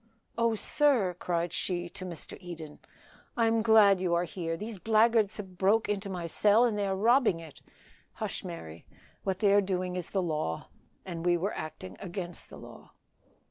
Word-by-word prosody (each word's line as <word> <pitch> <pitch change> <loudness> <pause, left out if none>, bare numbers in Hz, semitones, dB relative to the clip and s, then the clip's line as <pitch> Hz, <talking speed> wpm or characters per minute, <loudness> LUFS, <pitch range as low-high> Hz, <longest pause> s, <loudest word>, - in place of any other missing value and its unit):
"Oh, 230 -1 +2
sir," 230 -7 +2
cried 170 -1 -1
she 175 -1 -1
to 185 +1 -8
Mr. 170 -4 -7
Eden, 165 -4 -9 0.6
"I 230 - +3
am 225 0 +2
glad 215 -3 +6
you 175 -2 +1
are 170 - +2
here. 165 -1 -4
These 210 +1 -6
blackguards 220 0 +3
have 190 -4 -9
broke 210 +4 +3
into 205 -1 -2
my 180 -3 -4
cell, 210 +7 +4
and 230 -3 0
they 205 -1 0
are 190 - 0
robbing 225 -2 +3
it." 160 -3 -12 0.5
"Hush, - - -4
Mary; 80 0 -8 0.4
what 190 -2 -1
they 200 0 +3
are 205 - +6
doing 185 -2 -2
is 180 -2 -4
the 190 -2 0
law, 150 - -3 0.4
and 170 -3 -5
we 175 0 +3
were 195 +5 -2
acting 155 -12 -7
against 175 -1 -6
the - - -11
law." - - -13
185 Hz, 180 wpm, -29 LUFS, 170-210 Hz, 0.6 s, glad